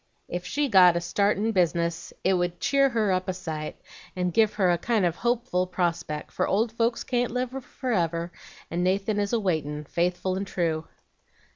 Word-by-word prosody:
Ef 175 0 -3
she 290 +7 0
got 180 -6 +6
a - - +1
start 200 +4 +1
in 220 +3 0
business 170 -3 0
it 190 - +3
would 175 -1 -1
cheer 275 -1 +3
her 220 -5 +1
up 185 +1 0
a 185 - 0
sight, 160 -4 -5 0.4
and 180 -1 -1
give 220 +1 +3
her 185 -4 +3
a 175 - +2
kind 220 -1 +1
of 170 -1 0
a - - -18
hopeful 235 -6 0
prospeck, 170 -4 -2
for 185 - 0
old 220 +3 +1
folks 230 0 0
can't 245 -1 0
live 250 +1 -2
forever, 170 - -2 0.4
and 175 +1 0
Nathan 195 +3 +1
is 205 -1 -1
a 235 - +2
waitin', 155 -6 -1
faithful 180 +4 -1
and 195 +1 -3
true.' 165 -3 -1
185 Hz, 190 wpm, -26 LUFS, 170-220 Hz, 0.4 s, got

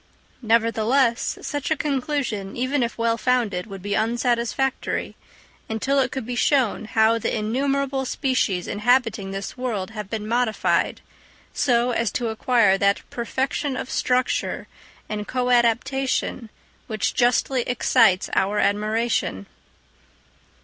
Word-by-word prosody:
Nevertheless, 230 +2 +2
such 290 -2 -3
a 315 - +1
conclusion, 265 -9 -2
even 255 +3 0
if 235 0 -2
well 230 0 +1
founded, 225 -7 0
would 195 -3 -9
be 205 0 -2
unsatisfactory, 240 +3 -1 0.5
until 265 +6 0
it 260 -2 +1
could 265 - -4
be 245 - -4
shown 245 -4 +1
how 220 +1 +3
the 225 - -1
innumerable 270 +5 0
species, 250 -10 0
inhabiting 225 -2 +1
this 195 0 -5
world 225 -6 -3
have 210 -3 -7
been 215 -2 -4
modified, 235 -1 +1 0.5
so 245 -2 +2
as 230 -2 0
to 240 -2 -1
acquire 220 -3 +3
that 200 0 +1
perfection 260 +3 -2
of 250 - -5
structure 255 0 0 0.4
and 210 -1 -4
coadaptation 250 0 +1 0.4
which 215 -2 -1
justly 250 +1 +2
excites 230 -5 +3
our 200 +2 +1
admiration. 210 - 0
235 Hz, 120 wpm, -23 LUFS, 215-255 Hz, 0.5 s, how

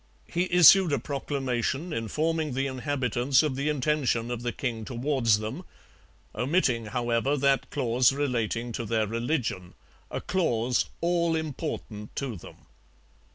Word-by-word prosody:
He 175 +2 -1
issued 180 0 +7
a - - +3
proclamation 140 +2 -2
informing 155 +6 -1
the 135 +1 0
inhabitants 130 -1 +1
of 150 -4 -1
the 140 +3 -1
intention 135 -5 0
of 120 -1 -3
the 120 0 -2
king 115 -3 -4
towards 120 -2 +1
them; 110 - -5 0.7
omitting, 125 -6 +1
however, 120 +4 0
that 140 0 +2
clause 125 -2 +2
relating 120 -4 -1
to 115 +1 -4
their 110 0 +1
religion, 115 - -2 0.3
a - - -3
clause 125 -9 0 0.2
all 170 -1 +1
important 145 -9 -5
to 135 -5 -3
them. 85 - -13
130 Hz, 130 wpm, -27 LUFS, 115-150 Hz, 0.7 s, issued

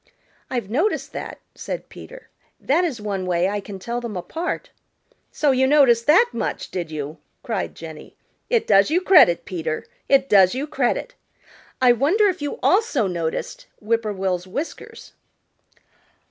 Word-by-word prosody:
"I've 245 -6 -3
noticed 310 - -1
that," - - -6 0.2
said - - -6
Peter. - - -13 0.3
"That 320 +6 +1
is 295 -10 -2
one 200 -3 -3
way 175 0 +1
I 205 +1 -2
can 200 0 -8
tell 235 +5 -4
them 230 -5 -5
apart." 325 - -4 0.6
"So 295 -2 +2
you 265 0 +3
noticed 260 -5 +4
that 370 +11 +6
much, - - -4
did 175 -3 -4
you?" 155 0 -6 0.2
cried 220 -6 -3
Jenny. 160 -2 -10 0.3
"It 470 -3 +2
does 200 +2 +4
you 330 +4 +2
credit, 365 - +5
Peter. 160 -3 -4 0.2
It 275 -1 +4
does 195 -2 +5
you 270 +3 -2
credit. 275 - -1 0.7
I 255 -1 +6
wonder 320 - +3
if 365 -4 -4
you 290 +9 -3
also 375 - +2
noticed 180 - -4
Whip 225 +2 0
poor 215 -2 -3
will's 185 -2 -2
whiskers." 285 - -7
235 Hz, 155 wpm, -22 LUFS, 190-305 Hz, 0.7 s, that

